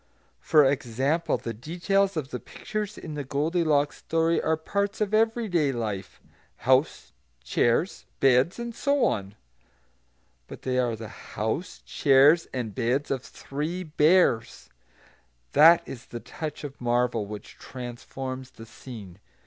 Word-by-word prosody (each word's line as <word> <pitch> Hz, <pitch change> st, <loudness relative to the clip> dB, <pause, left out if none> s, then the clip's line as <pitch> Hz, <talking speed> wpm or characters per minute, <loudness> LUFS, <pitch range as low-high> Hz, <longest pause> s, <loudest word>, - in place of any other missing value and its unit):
For 150 Hz, -, +5 dB
example, 135 Hz, +4 st, 0 dB
the 115 Hz, -, -5 dB
details 180 Hz, -, 0 dB
of 140 Hz, -3 st, -3 dB
the 125 Hz, -, -4 dB
pictures 215 Hz, -, -5 dB
in 155 Hz, -, -7 dB
the 145 Hz, -1 st, -4 dB
Goldilocks 150 Hz, +1 st, +1 dB
story 165 Hz, +1 st, +1 dB
are 160 Hz, 0 st, +1 dB
parts 200 Hz, +5 st, -2 dB
of 210 Hz, -1 st, -1 dB
everyday 215 Hz, -, +2 dB
life, 105 Hz, -6 st, -4 dB, 0.5 s
house, 130 Hz, +4 st, +2 dB, 0.3 s
chairs, 120 Hz, -, 0 dB
beds, 135 Hz, +5 st, +4 dB
and 235 Hz, 0 st, -5 dB
so 280 Hz, +2 st, +1 dB
on; 100 Hz, -1 st, -2 dB, 1.1 s
but -, -, -11 dB
they 130 Hz, -1 st, 0 dB
are 120 Hz, -2 st, +1 dB
the 110 Hz, 0 st, -8 dB
house, -, -, -4 dB
chairs, 140 Hz, -, +5 dB
and 120 Hz, -5 st, -4 dB
beds 130 Hz, +5 st, 0 dB
of 135 Hz, -2 st, -1 dB
three 155 Hz, +8 st, -5 dB
bears; 150 Hz, -6 st, +2 dB, 0.8 s
that 165 Hz, +3 st, +7 dB
is 125 Hz, -, -9 dB
the 120 Hz, -, -6 dB
touch 155 Hz, +5 st, -7 dB
of 140 Hz, -2 st, -8 dB
marvel 120 Hz, -3 st, +1 dB
which 105 Hz, 0 st, -9 dB
transforms 130 Hz, +1 st, -7 dB
the 115 Hz, -, -12 dB
scene. 110 Hz, -5 st, -11 dB
140 Hz, 135 wpm, -26 LUFS, 120-165 Hz, 1.1 s, that